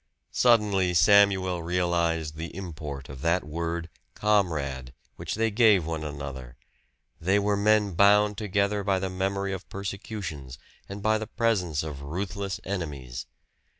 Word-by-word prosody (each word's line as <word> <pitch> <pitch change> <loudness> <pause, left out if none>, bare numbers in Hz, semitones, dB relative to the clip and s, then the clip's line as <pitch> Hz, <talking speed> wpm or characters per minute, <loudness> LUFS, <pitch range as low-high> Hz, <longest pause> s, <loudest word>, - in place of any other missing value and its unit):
Suddenly 105 -7 +3
Samuel 95 -2 +4
realized 85 -3 0
the 80 +2 -7
import 75 -7 -6
of 65 -1 -10
that 85 +3 +1
word 85 +2 -3 0.3
"comrade" 75 -11 0 0.2
which - - -4
they 115 +1 +1
gave 105 -6 +5
one 80 -1 -3
another; 70 -4 -7 0.6
they 95 +5 +2
were 100 0 +1
men 105 -1 +3
bound 105 +3 +5
together 100 -1 0
by 100 -1 +1
the 95 0 -3
memory 95 +1 -1
of 95 - -7
persecutions, 95 - -6 0.3
and 100 +1 -7
by 110 0 +3
the 110 - -5
presence 90 -11 0
of 75 -3 -6
ruthless 95 +5 -4
enemies. 70 -11 -5
90 Hz, 135 wpm, -27 LUFS, 80-100 Hz, 0.6 s, gave